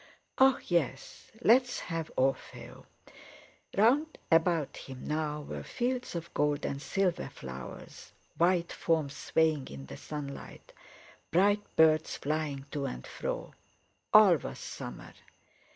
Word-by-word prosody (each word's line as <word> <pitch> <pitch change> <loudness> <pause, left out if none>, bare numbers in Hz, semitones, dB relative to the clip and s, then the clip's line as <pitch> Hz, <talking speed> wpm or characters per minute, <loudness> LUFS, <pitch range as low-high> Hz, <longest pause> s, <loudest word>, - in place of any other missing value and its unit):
"Ah! 265 0 +6
yes. 150 -6 -2
Let's 245 +2 +4
have 165 -2 -4
'Orfeo.'" 135 +1 -2 0.9
Round 275 +10 +3
about 165 -2 +3
him 130 -1 -9
now 150 -1 -2
were - - -6
fields 250 -3 -2
of 170 0 -5
gold 145 0 +1
and 140 - -3
silver 185 +1 0
flowers, 65 -1 -9 0.2
white 175 0 +2
forms 155 -4 0
swaying 160 -4 +1
in 70 -1 -8
the 70 - -9
sunlight, 145 -2 -8 0.6
bright 205 +4 +4
birds 160 0 +4
flying 145 -2 -2
to 145 -2 -2
and 65 - -6
fro. - - -5 0.6
All 205 -5 +8
was - - -7
summer. - - -8
160 Hz, 120 wpm, -31 LUFS, 140-190 Hz, 0.9 s, All